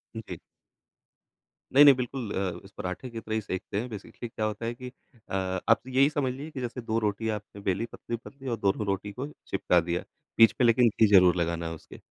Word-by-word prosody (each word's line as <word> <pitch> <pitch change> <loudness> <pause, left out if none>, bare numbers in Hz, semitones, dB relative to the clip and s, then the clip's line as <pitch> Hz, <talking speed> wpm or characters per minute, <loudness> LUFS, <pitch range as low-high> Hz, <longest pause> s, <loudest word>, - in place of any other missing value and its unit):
जी। 110 - -6 1.4
नहीं, 145 +2 +9
नहीं, 140 -2 +9
बिल्कुल 125 -3 -4
अ, 95 -2 -2
इस 95 - -14
पराठे 100 +6 -5
की 115 - -6
तरह 110 0 -4
ही 110 - 0
सेंकते 100 0 -4
हैं। 125 +2 -4
बेसिकली 105 +3 -8
क्या 110 -1 -3
होता 110 +2 -3
है 115 - -2
कि 125 +1 -8 0.4
अ, - - -7 0.4
आप 115 - +5
यही 135 +3 +4
समझ 140 -4 -1
लीजिए 145 +4 -8
कि 135 - -6
जैसे 125 +1 -4
2 115 0 -1
रोटी 110 +1 -1
आपने 105 -1 -5
बेलीं, 95 +3 0
पतली-पतली 130 +4 -7
और 115 - -1
दोनों 100 +1 0
रोटी 100 +1 -2
को 125 +6 -5
ही 150 - -10
चिपका 90 - +2
दिया। 85 +1 -2 0.3
बीच 115 -1 +7
में 125 - +6
लेकिन 120 +1 +5
घी 110 +1 +3
ज़रूर 90 -1 +7
लगाना 85 -1 -1
है 80 - -4
उसके, 80 - -13
110 Hz, 220 wpm, -28 LUFS, 100-125 Hz, 1.4 s, नहीं